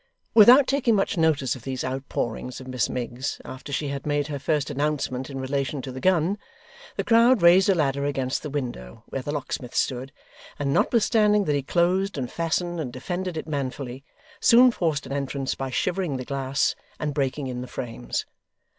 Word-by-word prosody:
Without 245 +5 +8
taking 255 -5 +2
much 200 +1 +1
notice 155 -7 +2
of 130 - -10
these 130 +1 -4
outpourings 130 -2 -3
of 130 - -10
Miss 125 -4 -1
Miggs 125 +1 -4
after 130 +2 -8
she 140 +1 -1
had 140 0 -4
made 145 0 0
her 145 -2 -3
first 145 0 0
announcement 140 -3 -2
in 135 -1 -5
relation 135 +1 -2
to 130 - -5
the 130 - -7
gun, 185 +4 +2 0.6
the - - -1
crowd 230 -2 +5
raised 180 +3 +6
a 195 - +5
ladder 140 -3 0
against 135 -2 -1
the 150 - -5
window 120 - -5
where 135 - -3
the 145 - -4
locksmith 135 -4 -4
stood, 130 +1 -1 0.5
and 140 -1 -1
notwithstanding 210 - +3
that 150 - +1
he 145 - +1
closed, 180 +5 +1
and 125 -3 -3
fastened, 170 +1 -1
and 135 -6 -3
defended 175 +7 -4
it - - -4
manfully, 135 -3 -4 0.4
soon 245 +2 +7
forced 160 -9 -1
an - - -9
entrance 140 -1 -2
by 135 0 -4
shivering 175 +2 -1
the 130 - -6
glass 135 0 0 0.3
and 150 -1 -2
breaking 140 0 -1
in 125 -1 -4
the 125 - -6
frames. 90 - -4
140 Hz, 185 wpm, -25 LUFS, 130-175 Hz, 0.6 s, Without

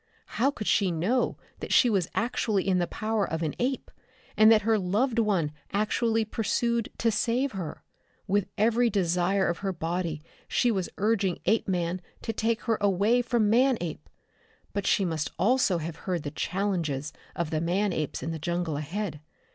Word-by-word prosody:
How 270 - +5
could 260 -7 -5
she 200 -2 +3
know 185 +10 0 0.2
that - - -6
she 250 - +6
was 195 -7 +1
actually 220 -4 0
in 185 -1 +3
the 175 - 0
power 215 -1 -1
of 160 -3 -2
an 155 - -1
ape, 260 +2 -1 0.4
and 215 +1 +7
that 220 -1 +5
her 220 0 +3
loved 220 +7 +1
one 190 -9 +1 0.2
actually 220 +2 +1
pursued 230 +1 0
to 230 - +2
save 240 +5 0
her? 180 -6 -6 0.4
With 200 -1 +1
every 230 +3 +3
desire 185 0 +1
of 170 - -1
her 195 -1 -1
body 165 -2 -3 0.2
she 245 - +2
was 190 -4 -1
urging 200 -3 +1
Apeman 180 -3 0 0.2
to 225 - -2
take 225 +1 0
her 225 -3 0
away 205 +5 +3
from 235 -3 +1
Manape. 220 - +1 0.6
But 200 -1 -2
she 195 - +3
must 160 -3 -2
also 210 -2 +3
have 165 -1 -5
heard 180 -5 -3
the 145 - -4
challenges 165 -8 -2 0.2
of 170 -2 -2
the 155 -1 0
man 185 +4 +1
apes 155 -2 -3
in 165 - -2
the 160 - -4
jungle 170 -1 -2
ahead. 160 +1 -4
195 Hz, 170 wpm, -27 LUFS, 170-225 Hz, 0.6 s, and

